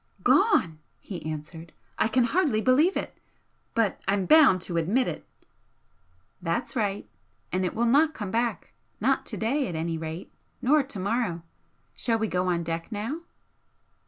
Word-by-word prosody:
"Gone!" 165 - +3 0.2
he 185 -4 -8
answered 160 +2 -8 0.3
"I - - +3
can 250 +2 +2
hardly 280 -3 +2
believe 270 - +3
it - - -5 0.6
but 225 -4 +1
I'm 195 -1 +1
bound 290 - +6
to 175 -1 -3
admit 210 +11 +1
it!" - - -5 1.1
"That's - - -2
right! 205 -4 -1 0.4
And 185 +1 0
it 180 - -2
will 235 +2 +1
not 300 +6 +4
come 205 -3 -5
back 230 - -1 0.3
not 265 +5 +1
to 215 - -4
day, 265 +8 0
at 175 - -5
any 165 0 -2
rate, 160 +2 -7 0.3
nor 295 +4 +4
to 270 -5 -7
morrow. 195 -4 -1 0.5
Shall 230 -2 0
we 220 0 -1
go 180 -1 -1
on 170 -1 0
deck 165 +4 -4
now?" 225 +9 -3
210 Hz, 160 wpm, -27 LUFS, 175-255 Hz, 1.1 s, bound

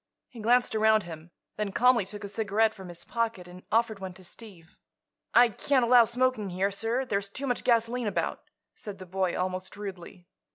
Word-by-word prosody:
He 240 - -12
glanced 240 +3 +3
around 220 -1 +4
him, 165 -1 -10 0.3
then 210 -1 -2
calmly 245 -2 +4
took 205 +1 -9
a - - -4
cigarette 215 +1 +1
from 190 -4 -11
his 175 0 -7
pocket 230 -6 -2
and 180 +1 -12
offered 225 -2 +1
one 190 -1 -6
to 185 - -15
Steve. 180 -3 -14 0.6
"I 245 0 +7
can't 255 +3 +1
allow 240 -1 +7
smoking 235 -3 0
here, 190 +3 0
sir; 225 +6 -1
there's 200 -4 -2
too 270 +7 -4
much 245 -2 -1
gasoline 235 0 +1
about," 205 - -2 0.3
said 205 -2 -8
the 185 - -10
boy, 185 0 -1
almost 185 +1 -3
rudely. 190 -3 -8
210 Hz, 190 wpm, -28 LUFS, 185-235 Hz, 0.6 s, I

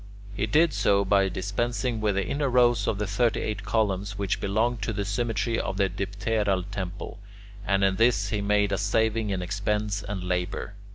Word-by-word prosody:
He 105 +2 -1
did 155 +6 +3
so 100 0 +2
by 95 0 +3
dispensing 115 +5 -2
with 105 -2 +1
the 100 -1 0
inner 140 +6 -1
rows 120 -4 +3
of 105 - 0
thirty 115 +4 +1
eight 105 -3 -3
columns 100 -2 -1
which 100 -1 -1
belonged 110 +4 0
to 110 +2 -2
the 100 0 -2
symmetry 115 +2 -1
of - - -3
the 100 -1 +2
dipteral 100 0 -1
temple, 100 +2 -5 0.5
and 100 -1 +2
in 95 -1 +2
this 115 -4 +2
way 105 - 0
he - - -2
made 100 0 +2
a 100 - 0
saving 110 +1 +1
in 95 -2 -2
expense 105 +2 -1
and 95 -2 -5
labour. 90 +2 -2
105 Hz, 185 wpm, -26 LUFS, 100-110 Hz, 0.5 s, did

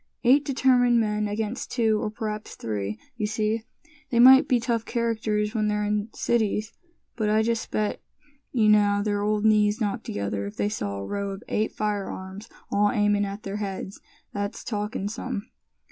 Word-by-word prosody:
"Eight 265 +4 +5
determined 250 -3 +3
men 210 -1 0
against 215 +3 -3
two, 220 -3 +1
or - - -1
p'raps 215 0 -5
three, 105 -1 -3 0.2
you 210 -2 -1
see. 215 +1 -1 0.4
They 240 - 0
may 260 +3 +9
be 255 -4 +1
tough 230 -1 -1
characters, 220 -3 -1
when 215 -2 +1
they're 210 0 0
in 210 +1 -1
cities, 215 -2 0 0.4
but 215 -2 0
I 215 +1 +3
just 230 0 -1
bet 210 -1 -1 0.5
you 225 -4 +3
now 205 -1 +4
their 205 -1 0
old 210 +1 0
knees 210 0 +4
knock 220 +1 -1
together 100 - -3
if 100 - -9
they 205 - +1
saw 100 - -3
a 100 - -5
row 200 - -3
of 195 +3 -7
eight 215 +1 0
firearms 200 -1 -4 0.2
all 205 +1 +3
aimin' 205 0 +2
at 200 +1 -6
their 200 +1 -4
heads. 195 -1 -5 0.3
That's 205 0 -4
talkin' 210 -2 -3
some." 220 0 -5
210 Hz, 175 wpm, -25 LUFS, 205-225 Hz, 0.5 s, may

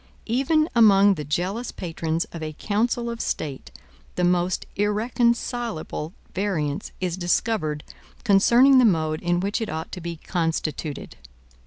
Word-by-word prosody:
Even 275 +6 +2
among 205 -3 +6
the 150 -6 -6
zealous 195 +9 -1
patrons 165 -1 -3
of 165 - -7
a 155 0 -4
council 235 +7 -1
of 235 0 -4
state 140 -4 -4 0.5
the 180 - 0
most 180 0 +1
irreconcilable 225 -5 -1 0.2
variance 165 -7 -2
is 180 -2 -1
discovered 175 -4 0 0.4
concerning 245 +5 +6
the - - +5
mode 160 -7 +2
in 175 0 +1
which 200 +4 -1
it 225 - -2
ought 160 0 -5
to 180 - -6
be 170 0 -4
constituted. 160 -3 -3
185 Hz, 135 wpm, -24 LUFS, 160-230 Hz, 0.5 s, among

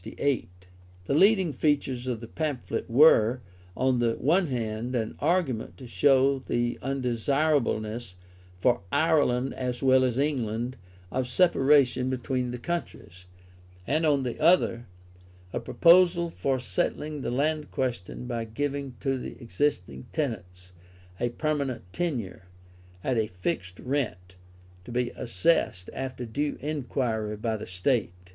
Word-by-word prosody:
The 140 -3 -1 0.6
leading 190 +1 +4
features 135 -3 0
of 120 -3 -2
the 115 - -8
pamphlet 145 -4 -3
were, 125 -2 +6 0.4
on 130 -1 +2
the 115 -1 +2
one 175 +5 +2
hand, 120 -1 -3
an 110 -2 -2
argument 150 -8 0
to 130 - -10
show 135 +2 +3
the 120 -2 -1
undesirableness, 125 -5 0 0.4
for 120 +6 +2
Ireland 140 -4 +2
as 125 0 -4
well 130 0 +5
as 125 -2 0
England, 125 -4 -1 0.4
of 130 -1 -1
separation 135 -4 +3
between 130 0 -2
the 125 - -4
countries, 120 - -5 0.6
and 155 - +1
on 145 -3 +3
the 125 -2 -4
other, 155 -8 +3 0.7
a - - -1
proposal 170 0 +4
for 135 -4 -1
settling 145 +7 -2
the - - -2
land 150 +4 0
question 125 -4 -3
by 120 -2 -3
giving 140 +3 -3
to 135 -1 0
the - - -8
existing 115 - -2
tenants 90 - -4 0.5
a 120 - 0
permanent 140 -1 -2
tenure, 120 - -3 0.6
at 130 -2 0
a 110 - +1
fixed 90 0 -4
rent, 110 -10 -3 0.5
to 105 - -10
be 125 0 -1
assessed 95 - 0
after 130 -2 -5
due 145 +6 -2
inquiry 125 -7 -2
by 110 +1 -1
the 110 - -7
State. 95 +1 0
130 Hz, 130 wpm, -27 LUFS, 115-145 Hz, 0.7 s, were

